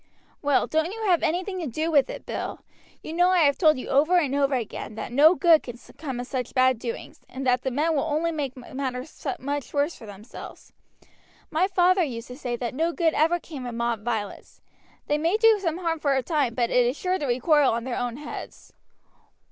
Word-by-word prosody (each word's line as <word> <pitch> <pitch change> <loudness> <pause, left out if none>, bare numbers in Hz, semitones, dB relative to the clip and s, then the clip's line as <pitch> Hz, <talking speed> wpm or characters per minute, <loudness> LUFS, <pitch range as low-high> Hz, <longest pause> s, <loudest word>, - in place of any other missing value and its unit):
"Well, 285 -2 +2
don't 315 +3 0
you 445 +1 -6
have 365 -5 +3
anything 360 +4 -1
to 335 - -3
do 310 +7 -2
with 285 -3 +4
it, - - -7
Bill. - - -5 0.4
You 310 - -6
know 355 +2 +4
I 365 -2 +4
have 285 -2 +4
told 310 -5 +5
you 255 - -6
over 310 +7 +4
and 290 -6 +1
over 280 -1 +2
again 220 -2 -5
that 225 - -6
no 305 +7 +6
good 335 -4 +5
can 245 -1 -8 0.2
come 270 -5 -4
of 245 - -4
such 250 -2 -4
bad 255 -2 +4
doings, 235 -1 -6
and 265 +1 -6
that 250 -1 +3
the 265 - -1
men 305 +5 0
will 280 - +2
only 320 +2 0
make 280 -5 -4
matters 260 +3 -6
much 285 +1 -4
worse 290 +4 +1
for 225 - -12
themselves. 205 +3 -11 0.8
My 335 +4 +2
father 370 0 +3
used 250 -7 -3
to 250 - -7
say 245 -3 -3
that 240 0 -4
no 325 +5 0
good 330 -2 +1
ever 330 +3 +2
came 280 -7 -8
of 240 - -5
mob 235 -2 -1
violence. 220 -4 -4 0.5
They 295 +1 0
may 335 +7 +2
do 450 -1 +5
some 335 -4 -1
harm 335 -3 -2
for 285 -2 +1
a 265 - 0
time, 285 -7 0
but 240 -2 0
it 250 - +4
is 255 +4 -1
sure 370 0 -1
to 290 - -2
recoil 275 +3 +3
on 230 0 -2
their 255 -1 -3
own 245 0 -3
heads." 300 +1 -9
285 Hz, 220 wpm, -25 LUFS, 250-330 Hz, 0.8 s, no